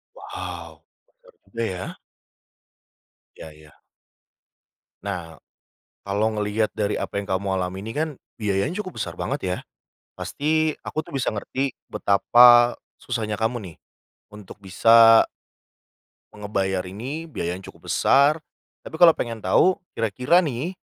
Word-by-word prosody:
Wow, - - -8 0.4
mahal - - -20
juga 115 -1 -6
ya. 95 -3 -5 1.4
Iya 80 - -10
iya. 75 -1 -18 1.3
Nah, 85 -5 -6 0.6
kalau 100 +2 0
ngelihat 105 +1 -1
dari 105 -1 -1
apa 100 - -3
yang 100 - -11
kamu 95 +1 -1
alami 95 +2 -5
ini 110 - -5
kan, 155 +1 -1 0.3
biayanya 105 - -1
cukup 185 -2 -9
besar - - -4
banget, 135 +2 -3
ya. 90 0 -1 0.6
Pasti 155 +1 -1
aku 155 - -3
tuh 155 - -12
bisa 130 - -1
ngerti 130 +5 -3 0.2
betapa 120 +4 +5 0.2
susahnya 110 -4 -3
kamu 115 +2 0 0.2
nih - - -22 0.5
untuk 105 -1 -13
bisa 115 +4 +6 1.1
Ngebayar 100 -2 -2
ini 135 - -6
biayanya 90 - -5
cukup - - -9
besar. 140 +4 +4 0.5
Tapi - - -8
kalau 165 0 +8
pengen 115 -7 -5
tahu, 180 - +4 0.2
kira-kira 125 - +2
nih, 155 +1 -2
110 Hz, 125 wpm, -23 LUFS, 100-140 Hz, 1.4 s, kalau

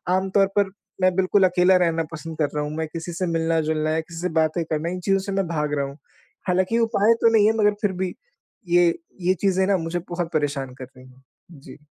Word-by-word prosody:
आम 190 +1 0
तौर 195 0 +4
पर 200 -1 +3 0.3
मैं 185 0 +4
बिल्कुल 190 +1 +3
अकेला 180 +1 +4
रहना 165 -2 +1
पसंद 160 0 -7
कर 150 -2 +1
रहा 150 - 0
हूँ। 150 - -4
मैं 160 0 -2
किसी 165 +2 -6
से 180 +2 -2
मिलना-जुलना 160 -1 0
या 160 - +1
किसी 165 +1 -10
से 180 - -1
बातें 160 +2 +1
करना, 155 +1 -2
इन 180 +1 -4
चीज़ों 195 +2 +1
से 195 +1 -5
मैं 195 -2 0
भाग 150 -3 -2
रहा 140 - 0
हूँ। 140 +1 -9 0.5
हालाँकि 185 +4 +1
ये 235 - +3
उपाय 225 -1 +3
तो 230 - +5
नहीं 210 -2 +5
है 220 - +3
मगर 210 -1 +3
फ़िर 205 -3 +1
भी, 185 0 -3 0.5
ये 175 0 +4 0.3
ये 180 +1 +3
चीज़ें 190 -1 +2
ना 200 -1 +3
मुझे 165 +1 -3
बहुत 175 -1 -3
परेशान 145 -4 -1
कर 130 - -8
रही 130 0 -15
हैं। 130 +1 -20 0.3
जी। 145 -5 -13
175 Hz, 235 wpm, -23 LUFS, 155-190 Hz, 0.5 s, तो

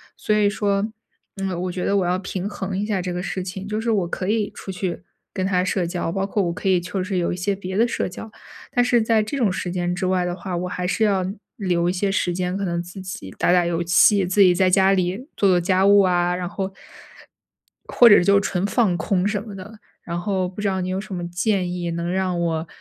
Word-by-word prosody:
所 210 - 0
以 210 -1 +3
说， 205 0 0 0.5
嗯， 185 -3 -2
我 180 - -2
觉 180 0 -4
得 200 - +1
我 185 - +1
要 180 +1 0
平 190 0 -4
衡 190 -2 -4
一 205 - -1
下 200 -4 -1
这 180 0 -3
个 180 +1 -3
事 190 - -3
情， 190 +1 -6
就 215 +1 -2
是 230 - -2
我 195 -6 +1
可 185 +2 -4
以 215 -1 0
出 190 - -7
去 185 -2 -4 0.3
跟 185 -1 -2
他 180 -2 +1
社 185 -2 0
交， 175 -1 -3
包 195 +1 -1
括 205 0 0
我 170 -1 -1
可 195 - -2
以 180 -2 +4
就 185 +2 -3
是 185 0 -2
有 175 0 0
一 - - -3
些 195 +2 -1
别 190 -1 -6
的 235 +2 +4
社 - - -2
交， 215 +4 -9 0.4
但 245 0 +2
是 240 -2 +3
在 220 -1 +2
这 220 +7 -5
种 220 -7 +2
时 180 -1 -3
间 175 -1 -1
之 185 0 -2
外 185 -1 +1
的 175 0 -2
话， 185 -2 -5
我 180 +1 -3
还 180 0 -3
是 220 +4 0
要 195 -3 +2 0.3
留 175 -3 0
一 180 - 0
些 195 +1 0
时 185 -3 0
间， 180 +1 -2
可 200 - -3
能 170 -1 -2
自 180 +2 -9
己 185 - -7
打 - - +3
打 180 -1 +4
游 170 0 -1
戏， 180 +2 +4
自 190 +3 -1
己 185 -2 +7
在 185 +1 +3
家 190 +1 +4
里 185 0 0 0.2
做 200 - +3
做 180 -1 +4
家 190 +2 +2
务 200 0 +7
啊， 180 -1 +2
然 180 -1 -3
后， 195 0 -4 1.2
或 240 - +6
者 205 - +7
就 200 +1 +5
纯 190 -2 -2
放 205 -5 +2
空 185 +2 0
什 205 -1 -1
么 210 -3 -9
的。 205 +3 -10 0.2
然 170 0 -4
后 185 -1 -1
不 185 - -11
知 205 - 0
道 190 -1 0
你 180 - -3
有 185 +1 -1
什 200 -1 -7
么 175 -1 -4
建 180 +1 0
议 175 -1 -3
能 170 +1 -3
让 185 -1 -1
我 165 -1 -1
185 Hz, 275 characters per minute, -22 LUFS, 180-200 Hz, 1.2 s, 己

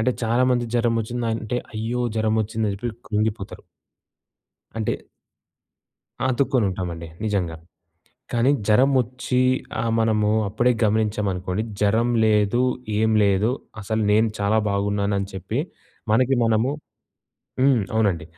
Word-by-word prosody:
అంటే 120 +3 +2
చాలా 115 +3 +2
మందికి 120 -2 0
జరమొచ్చిందంటే, 115 0 -1 0.2
అయ్యో! 115 +3 -2 0.2
జరమొచ్చిందని 110 -1 0
జెప్పి 120 +4 -3 0.2
కృంగిపోతరు. 105 -2 -2 1.1
అంటే 110 - 0 1.3
ఆ! - - +1
అతుక్కొని 130 -2 +1
ఉంటామండి. 85 -3 -5 0.2
నిజంగా. 95 -6 -1 0.8
కానీ 120 +3 +3 0.2
జరమొచ్చి 125 +2 +2 0.4
ఆ - - -2 0.2
మనము 110 -2 +2 0.2
అప్పుడే 115 +5 +2
గమనించాం 105 -1 +1
అనుకోండి, 90 +3 -3 0.2
జరం 110 +4 +2 0.2
లేదు 105 +2 +3 0.4
ఏం 110 0 +2
లేదు 100 +3 +2 0.3
అసలు 110 +2 -1
నేను 110 +2 +4
చాలా 100 +2 +2
బాగున్నాను 100 0 0
అని 100 - -3
చెప్పి, 95 -2 -3 0.5
మనకి 130 +4 +3
మనము 115 +3 +2 0.9
హ్మ్. 130 -3 +4
అవునండి. 100 -6 +1
110 Hz, 110 wpm, -23 LUFS, 100-120 Hz, 1.3 s, నేను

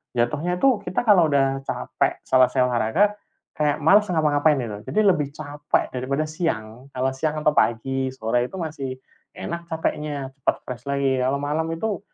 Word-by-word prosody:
Jatuhnya 150 +9 0
itu 250 -5 +3
kita 185 +6 -2
kalau 175 -7 +5
udah 135 -1 +1
capek - - -2
selesai 130 -1 +4
olahraga, 125 - +2 0.4
kayak 150 0 -1
males 205 +7 +5
ngapa-ngapain, 155 -3 +2
gitu. 105 -3 -5
Jadi 215 - 0
lebih 165 -8 +3
capek 150 -1 -2
daripada 135 +4 -1
siang. 135 -7 -4
Kalau 130 +1 0
siang 150 +4 -2
atau 150 - +4
pagi, 130 0 +1
sore 120 +1 0
itu - - -11
masih 150 -7 -4 0.4
enak 170 0 -6
capeknya, 150 -4 -3
cepat - - +1
fresh 125 0 -8
lagi. 140 -1 +1
Kalau 130 +2 +1
malam 150 +3 -1
itu 210 +4 -2
145 Hz, 160 wpm, -23 LUFS, 130-160 Hz, 0.4 s, kalau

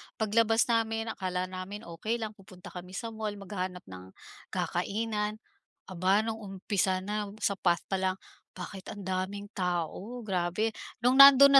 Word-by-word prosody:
Paglabas 225 0 +3
namin 225 0 +1
akala 185 -2 -2
namin 190 +3 -6
okey 175 +7 -2
lang 220 -3 -3
pupunta 190 -3 -13
kami 180 +1 -8
sa 230 +2 -4
mall, 215 -2 -3
maghahanap 185 -2 -4
ng 95 0 -11 0.3
kakainan. 210 0 -1 0.5
Aba, 190 +3 +2
nung 225 0 -3
umpisa 195 -2 0
na 210 +1 -2 0.2
sa 200 -2 +1
path 175 -1 +2
pa 195 - +2
lang, 185 0 +1 0.4
"bakit 185 +1 -7
ang 205 -2 -6
daming 190 +2 -3
tao, 185 +6 -2
grabe!" 190 +2 0 0.3
nung 255 +2 +5
nando'n 275 0 +11
200 Hz, 145 wpm, -30 LUFS, 185-220 Hz, 0.5 s, nando'n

